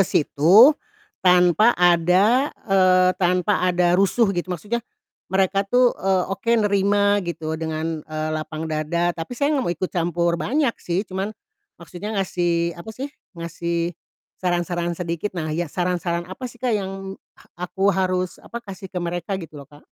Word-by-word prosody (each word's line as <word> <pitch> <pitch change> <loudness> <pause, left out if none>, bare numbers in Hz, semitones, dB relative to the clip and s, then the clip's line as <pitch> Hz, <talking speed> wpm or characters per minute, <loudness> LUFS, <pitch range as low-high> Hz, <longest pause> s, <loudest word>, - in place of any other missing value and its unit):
situ 180 - +6 0.5
tanpa 180 +5 +4
ada, 180 - +4 0.2
eee, 185 -1 +5
tanpa 180 +2 +2
ada 180 -1 +2
rusuh, 195 +3 +3
gitu, 175 0 -3
maksudnya 210 +7 -3 0.5
mereka 190 +1 +2
tuh 245 +1 +4
eee, 190 -1 +2
oke 195 +4 -3
nerima 205 0 +2
gitu 165 -3 -4
dengan, 160 0 -3
eee, 155 0 -4
lapang 155 0 -4
dada, 160 +2 -1
tapi 165 +9 -7
saya 285 +3 +1
nggak 275 -4 +1
mau 175 - +1
ikut 185 - -3
campur 170 0 0
banyak 275 -1 +1
sih, 180 +4 -1
cuman 190 +1 -3 0.5
maksudnya 190 +5 -7
ngasih, 175 -3 0
apa 170 - -11
sih, 280 +3 -5 0.2
ngasih 170 +1 -3 0.5
saran-saran 175 -1 -1
sedikit, 175 +3 -4
nah 155 -2 -2
ya, 170 +1 -2
saran-saran 175 0 -2
apa 190 +8 -7
sih, 245 - -15
Kak, 245 -1 -1
yang 195 -1 -3 0.2
ha - - -20 0.2
aku 195 +2 +1
harus, 185 -1 -1
apa, 235 - -10
kasih 190 -2 -9
ke 185 - -11
mereka 175 +3 -2
gitu 160 -5 -9
loh, 140 - -14
Kak? 145 -1 -17
180 Hz, 155 wpm, -22 LUFS, 170-195 Hz, 0.5 s, situ